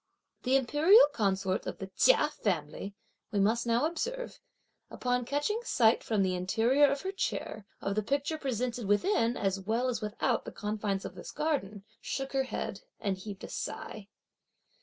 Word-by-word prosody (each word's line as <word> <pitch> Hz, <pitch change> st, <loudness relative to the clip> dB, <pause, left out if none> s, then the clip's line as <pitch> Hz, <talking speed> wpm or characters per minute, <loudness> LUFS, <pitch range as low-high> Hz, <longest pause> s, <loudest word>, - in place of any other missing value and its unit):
The 260 Hz, +1 st, +2 dB
imperial 300 Hz, -, +6 dB
consort 195 Hz, -4 st, 0 dB
of -, -, -4 dB
the 195 Hz, -, -5 dB
Chia -, -, +5 dB
family, 195 Hz, -, -3 dB, 0.4 s
we 205 Hz, -, 0 dB
must 225 Hz, +4 st, +2 dB
now 235 Hz, +5 st, +3 dB
observe, 485 Hz, +10 st, -3 dB, 0.5 s
upon 250 Hz, -1 st, -1 dB
catching 290 Hz, -, -1 dB
sight, 235 Hz, -, +3 dB
from 215 Hz, -3 st, +1 dB
the 185 Hz, -1 st, +1 dB
interior 225 Hz, +10 st, +3 dB
of 280 Hz, +1 st, -1 dB
her 380 Hz, -, -3 dB
chair, 220 Hz, -, -3 dB
of 195 Hz, -, -1 dB
the 215 Hz, -, +1 dB
picture 280 Hz, +7 st, -1 dB
presented 245 Hz, -4 st, -2 dB
within 230 Hz, -, +2 dB
as 195 Hz, -1 st, 0 dB
well 225 Hz, +6 st, 0 dB
as 235 Hz, -3 st, -2 dB
without 220 Hz, +3 st, 0 dB
the -, -, -7 dB
confines 205 Hz, -2 st, -2 dB
of -, -, -6 dB
this -, -, -9 dB
garden, 275 Hz, -11 st, -2 dB, 0.2 s
shook 270 Hz, 0 st, -4 dB
her 270 Hz, -1 st, +1 dB
head -, -, -4 dB, 0.2 s
and 200 Hz, -3 st, -1 dB
heaved 200 Hz, 0 st, -8 dB
a -, -, -5 dB
sigh. 210 Hz, -2 st, -6 dB
235 Hz, 165 wpm, -30 LUFS, 200-280 Hz, 0.5 s, imperial